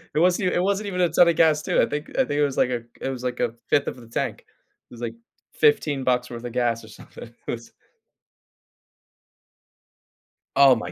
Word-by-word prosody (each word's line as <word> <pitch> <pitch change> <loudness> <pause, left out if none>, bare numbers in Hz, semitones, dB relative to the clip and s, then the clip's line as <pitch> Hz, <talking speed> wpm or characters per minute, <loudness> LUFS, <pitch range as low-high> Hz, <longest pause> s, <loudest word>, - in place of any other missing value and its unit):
It - - +3
wasn't 180 +2 +3
e - - -1
it - - +2
wasn't 200 +1 0
even 180 -2 -2
a 175 - +3
ton 175 - +5
of 170 - +3
gas 155 -2 +4
too, - - +2
I - - +4
think 150 +1 -4
I 265 - +1
think - - -6
it 145 +1 +2
was 140 -2 -1
like 125 - +3
a 120 -2 -2 0.2
it 135 - -2
was 130 -1 -5
like 125 -1 -3
a 115 - 0
5th 140 - +2
of - - -4
the 120 -2 -13
tank. 115 - -3 0.5
It - - -12
was 120 - -11
like, 120 - -4 0.4
15 150 - +2
bucks 125 -1 +1
worth 120 -1 -8
of 120 - -5
gas 120 -2 0
or - - -12
something. 115 +2 -12
It - - -1
was 115 0 -7 2.8
Oh 135 -2 +7
my 90 -5 -5
135 Hz, 225 wpm, -24 LUFS, 120-170 Hz, 2.8 s, Oh